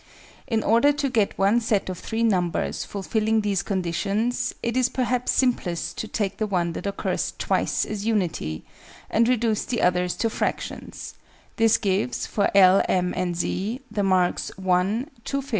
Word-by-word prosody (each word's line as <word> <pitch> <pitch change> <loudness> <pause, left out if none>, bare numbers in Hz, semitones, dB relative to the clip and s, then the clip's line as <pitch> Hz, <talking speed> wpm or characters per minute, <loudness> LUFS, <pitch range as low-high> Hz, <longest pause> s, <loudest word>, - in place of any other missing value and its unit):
In 225 -2 0
order 235 +7 +4
to 280 -2 -1
get 220 -5 +1
one 200 +4 +3
set 220 -4 0
of 185 - -3
3 225 +1 -2
numbers 180 -6 0
fulfilling 220 +2 0
these 200 -3 0
conditions, 200 +7 -1
it 235 0 -1
is 255 -1 +3
perhaps 250 -1 0
simplest 220 -10 0
to 220 - -3
take 205 -2 -2
the 215 - -1
one 175 -4 0
that - - -5
occurs 200 - -2
twice - - 0
as 210 -2 -5
unity, 175 - -1 0.5
and 230 +1 +3
reduce 230 -3 +1
the 240 - -2
others 180 0 +2
to 230 - 0
fractions: - - -4 0.4
this 225 -1 +4
gives, 190 - -1
for 200 - 0
L, 190 0 +7
M, 180 -1 +1
and 180 -1 -1
Z, 205 +8 -2
the 205 - -1
marks 185 -2 +1
1, 190 +7 +1 0.2
2/5, 275 - -4
4/3. - - -15
205 Hz, 165 wpm, -24 LUFS, 185-230 Hz, 0.5 s, L